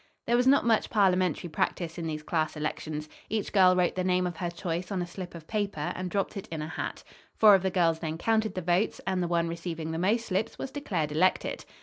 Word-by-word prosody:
There 235 - +2
was 250 +1 +3
not 275 -1 +5
much 225 -2 +2
parliamentary 185 -5 +2
practice 170 +1 -2
in 165 - -3
these 155 -1 -4
class 155 -1 -1
elections. 150 0 -4 0.2
Each 215 -1 -2
girl 185 -2 +6
wrote 180 -1 +2
the 185 - -1
name 180 0 +2
of 175 -2 -4
her 175 - -2
choice 170 +1 -4
on 195 - -1
a 175 - -1
slip 175 0 -8
of 165 -2 -10
paper 205 -7 -2
and 185 0 -4
dropped 195 +1 -1
it 195 - -6
in 160 -2 -4
a - - -4
hat. 160 - -5 0.3
Four 215 -2 +7
of 195 - +5
the 190 - +1
girls 170 -3 +2
then 160 -1 -3
counted 220 +3 +1
the 185 - -3
votes, 175 +5 +1
and 190 -1 0
the 175 - 0
one 170 -1 +1
receiving 165 -1 -4
the 160 - -3
most 220 +6 +1
slips 195 +4 -1
was 270 - -5
declared 180 - -2
elected. 180 +5 +1
180 Hz, 240 wpm, -28 LUFS, 165-195 Hz, 0.3 s, Four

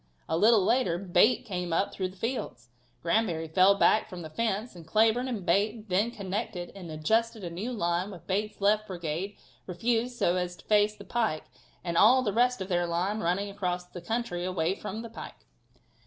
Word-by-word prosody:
A 160 - 0
little 210 +2 +5
later 225 -7 +2
Bate 185 +5 +3
came 180 -4 -3
up 165 +4 0
through 185 - -2
the 185 - -12
fields, 180 - -4 0.3
Granbury 170 -3 +1
fell 185 +5 +5
back 215 +2 +3
from 180 -4 -7
the 155 - -8
fence 220 +3 -2
and 165 -2 -12
Cleburne 225 +6 +3
and 220 -8 -4
Bate 210 +4 +1
then 200 +5 +2
connected 200 -4 -4
and 185 -4 -9
adjusted 220 +8 0
a 170 - -5
new 200 +9 -4
line 175 -4 -1
with 180 -6 -11
Bate's 210 +2 -2
left 210 +1 +2
brigade 175 +2 -4 0.3
refused 235 +6 -1
so 175 -4 +2
as 180 0 -2
to - - -18
face 210 0 +3
the 200 - -11
pike 220 -10 -1 0.4
and 170 -2 -2
all 255 +4 +6
the 205 - -1
rest 245 0 +2
of 190 - -3
their 175 -2 0
line 180 +5 -1
running 200 +3 -1
across 180 -3 -2
the 180 0 -10
country 200 -3 -2
away 180 -1 0
from 215 +3 -6
the 230 - -7
pike. - - -10
195 Hz, 195 wpm, -28 LUFS, 175-220 Hz, 0.4 s, all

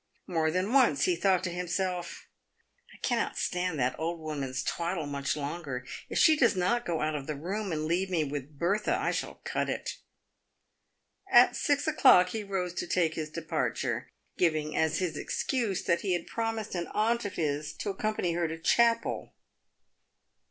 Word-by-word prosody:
More 160 -3 +1
than 185 +7 -1
once 270 0 +4
he 365 -2 +2
thought 190 - +2
to 180 - -2
himself, 180 0 -3 0.3
" - - -30
I - - -15
cannot - - 0
stand 180 -3 -1
that 125 -1 +1
old 165 +1 -2
woman's 140 -5 -3
twaddle 170 +1 -2
much 140 0 -2
longer. 140 -4 -4 0.2
If - - -3
she 315 - +6
does 240 -7 +3
not 235 +7 +1
go 165 -2 -1
out 155 0 0
of 145 -2 -4
the 155 - -2
room, 190 +7 -3
and 155 -1 -1
leave 180 +4 0
me 170 -4 +1
with 145 0 -6
Bertha, 200 +7 +1
I - - 0
shall - - -4
cut - - -1
it." - - -3 1.3
At - - +7
six 290 0 +1
o'clock 255 - +6
he 220 +2 -3
rose 190 -3 -2
to - - -3
take 170 -3 +1
his 155 -1 -4
departure, 135 -7 -2 0.3
giving 155 -3 +1
as 160 -1 +2
his 175 -4 -1
excuse 220 - -1
that 170 - +1
he 190 -3 0
had 175 -1 -1
promised 225 -2 -3
an 175 -2 -2
aunt 230 +2 +2
of 205 - -5
his 150 -1 -1
to 205 - -3
accompany 195 -3 -1
her 170 0 0
to 160 +1 -5
chapel. 230 +7 +2
175 Hz, 180 wpm, -29 LUFS, 155-200 Hz, 1.3 s, At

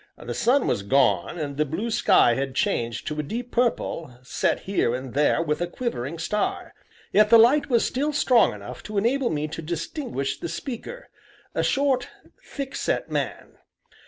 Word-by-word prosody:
The - - -6
sun 255 +3 +2
was - - 0
gone, 100 - +2
and 145 -3 -4
the 150 - +3
blue 175 +11 -3
sky 120 - +4
had 135 +1 -3
changed 115 -2 -1
to 150 0 -3
a - - +2
deep 235 +11 -5
purple, 165 - -1
set 125 - 0
here 190 -11 0
and 130 -1 -6
there 150 +3 +2
with 150 0 -2
a 175 - 0
quivering 170 - -4
star. 210 +6 -2 0.4
Yet 210 +1 +5
the 230 - +8
light 255 +7 +5
was 235 -3 +3
still 285 +4 -1
strong 250 - +4
enough 105 +4 -9
to 210 - -4
enable 240 +5 +1
me 150 -1 -2
to 160 +1 -6
distinguish 165 - -4
the 170 - -4
speaker 260 - -6 0.5
a - - 0
short, 270 -3 +1 0.3
thick 275 -2 -6
set - - -2
man. - - -4
170 Hz, 175 wpm, -24 LUFS, -, 0.5 s, the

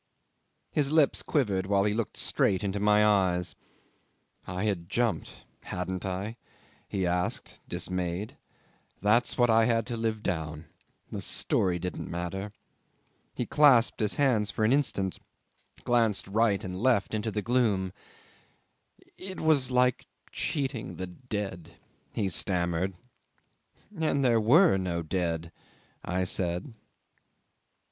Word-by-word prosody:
His 145 -1 +1
lips 155 -3 +4
quivered 100 - 0
while 100 -1 +3
he 105 0 +1
looked 115 0 -3
straight 95 +2 +1
into 100 0 -1
my 105 +1 +4
eyes. 90 -4 +2 0.9
"I 90 +1 -3
had 95 -5 -2
jumped 120 +1 -2 0.2
hadn't 90 +1 -4
I?" 100 +5 -4 0.5
he 95 -2 -1
asked, 90 0 -2
dismayed. 90 +2 -3 0.6
"That's 105 +5 +2
what 120 -2 +4
I 110 0 +5
had 115 -1 +1
to 120 - -4
live 110 -1 -2
down. 80 -2 -3 0.5
The - - -4
story 90 -2 +1
didn't 90 +1 -5
matter."... 90 +4 -4 0.8
He - - -2
clasped 135 -5 +5
his 105 -2 0
hands 120 -7 +2
for 110 +2 0
an 115 - +4
instant, 100 -10 0 0.6
glanced 115 -5 +2
right 105 0 +1
and 90 0 -5
left 110 0 +1
into 110 +1 -1
the 105 -1 -3
gloom: 105 -7 +1 1.3
"It 190 0 -6
was 150 -5 +3
like 125 -1 +2 0.2
cheating 130 - -3
the 95 - -4
dead," 95 -5 -6 0.4
he 105 - -1
stammered. 90 0 0 1.0
'"And 155 -5 +1
there 115 -3 +4
were 140 - +5
no 85 -3 -2
dead," 85 -1 -2 0.5
I 90 +1 -1
said. 90 +5 -1
105 Hz, 125 wpm, -28 LUFS, 90-120 Hz, 1.3 s, I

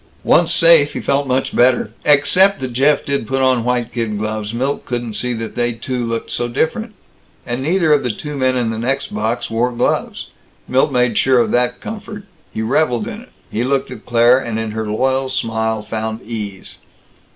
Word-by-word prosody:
Once - - +3
safe, 165 -4 +5
he - - -4
felt 140 0 0
much 130 +1 -1
better. 120 -3 +3
Except 180 +7 +4
that 130 -2 -5
Jeff 140 +4 +2
did 140 -5 -2
put 135 +2 0
on 130 -3 +2
white 125 -1 -1
kid 115 -3 -2
gloves, 110 0 -3
Milt 130 +4 -2
couldn't 120 -2 -4
see 125 +3 -1
that 115 -1 -5
they 120 0 0
two 125 +2 -4
looked 115 -1 -3
so 120 - -1
different. 205 - -2 0.5
And 120 +1 -3
neither 160 +1 +2
of 145 - +3
the 125 - -2
two 150 +6 -5
men 130 -1 +1
in 120 -2 0
the 110 - -4
next 135 +4 -2
box 110 +3 -2
wore 120 +2 +1
gloves. 120 - -1 0.4
Milt 130 +1 +2
made 125 -3 +2
sure 130 -1 +3
of 120 - +2
that 125 0 +1
comfort; 210 -1 -7 0.3
he 110 - -3
reveled 120 -1 +1
in - - -7
it; - - -17 0.2
he 115 - -1
looked 135 0 -1
at 115 -4 -10
Claire, 120 +1 +5
and 115 -4 -4
in 110 -1 -3
her 110 0 -4
loyal 130 +5 0
smile 110 -4 -1
found 110 +1 -4
ease. 105 -4 -6
125 Hz, 195 wpm, -18 LUFS, 115-135 Hz, 0.5 s, safe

